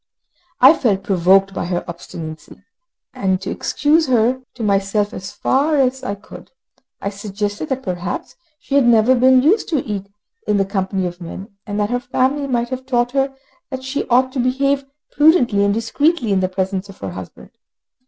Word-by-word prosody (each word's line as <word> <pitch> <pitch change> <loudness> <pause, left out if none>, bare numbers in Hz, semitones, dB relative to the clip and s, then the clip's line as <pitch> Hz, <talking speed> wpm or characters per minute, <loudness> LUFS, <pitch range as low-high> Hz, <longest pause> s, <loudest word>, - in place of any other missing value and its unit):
I 265 +4 +9
felt 200 -9 0
provoked 195 +1 +3
by - - -3
her 175 0 -2
obstinacy, 165 -2 -9 0.5
but 190 -1 0
to - - -4
excuse 315 +2 +1
her 250 +1 +2
to 240 - -6
myself 200 0 +1
as 190 +2 -7
far 290 +4 +1
as 265 -1 +1
I 200 -5 -3
could, 200 - -13 0.5
I 200 - -3
suggested 205 +5 -4
that 265 -1 -2
perhaps 175 -1 -4 0.2
she 275 - -8
had 280 -3 +4
never 230 +1 +5
been 255 +1 +5
used 385 +9 +2
to 305 -6 0
eat 200 -2 -4 0.4
in 210 - +2
the 195 - +2
company 190 -1 -2
of 175 0 -6
men, 190 +5 -9
and 205 0 -3
that 205 +2 0
her 245 - +1
family 270 +2 0
might 240 -2 -1
have 260 0 -6
taught 245 -2 +1
her 270 0 0 0.3
that 260 -2 -6
she 265 +2 -3
ought 255 +1 +3
to 265 - -4
behave 275 +2 +1 0.3
prudently 265 - +4
and 200 - +3
discreetly 230 +4 0
in 195 - +3
the 185 0 0
presence 190 +1 -3
of 195 - -12
her 95 - -6
husband. 90 0 -10
225 Hz, 185 wpm, -19 LUFS, 195-265 Hz, 0.5 s, I